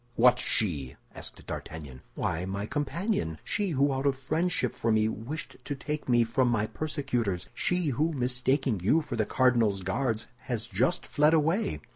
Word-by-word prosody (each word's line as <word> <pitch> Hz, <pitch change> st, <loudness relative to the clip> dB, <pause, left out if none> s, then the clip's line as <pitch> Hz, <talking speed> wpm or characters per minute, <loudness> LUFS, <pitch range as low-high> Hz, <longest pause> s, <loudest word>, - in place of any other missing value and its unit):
_ -, -, -37 dB
What 125 Hz, +1 st, +5 dB
she?" 75 Hz, -, 0 dB, 0.2 s
asked -, -, -6 dB
D'Artagnan. 70 Hz, -5 st, -7 dB
"Why, 80 Hz, +3 st, -1 dB
my 100 Hz, +2 st, -3 dB
companion. 145 Hz, -, -1 dB
She 205 Hz, -2 st, 0 dB
who 140 Hz, -3 st, +2 dB
out 135 Hz, +1 st, 0 dB
of 140 Hz, -, +2 dB
friendship 155 Hz, 0 st, 0 dB
for 115 Hz, -, 0 dB
me 110 Hz, 0 st, +3 dB
wished 115 Hz, +8 st, -5 dB
to 145 Hz, -, -3 dB
take 150 Hz, +1 st, -4 dB
me 120 Hz, -1 st, +5 dB
from 120 Hz, +3 st, +1 dB
my 115 Hz, -3 st, +2 dB
persecutors. 125 Hz, -, -2 dB
She 180 Hz, -3 st, +1 dB
who, 150 Hz, +6 st, +1 dB
mistaking 130 Hz, -, +1 dB
you 110 Hz, -, +3 dB
for 140 Hz, -5 st, -4 dB
the 110 Hz, -2 st, 0 dB
cardinal's 115 Hz, -7 st, +3 dB
Guards, 110 Hz, +3 st, -1 dB, 0.2 s
has 115 Hz, -3 st, -2 dB
just 125 Hz, -, 0 dB
fled 150 Hz, +2 st, +4 dB
away." 170 Hz, +8 st, +1 dB
125 Hz, 170 wpm, -29 LUFS, 110-150 Hz, 0.2 s, What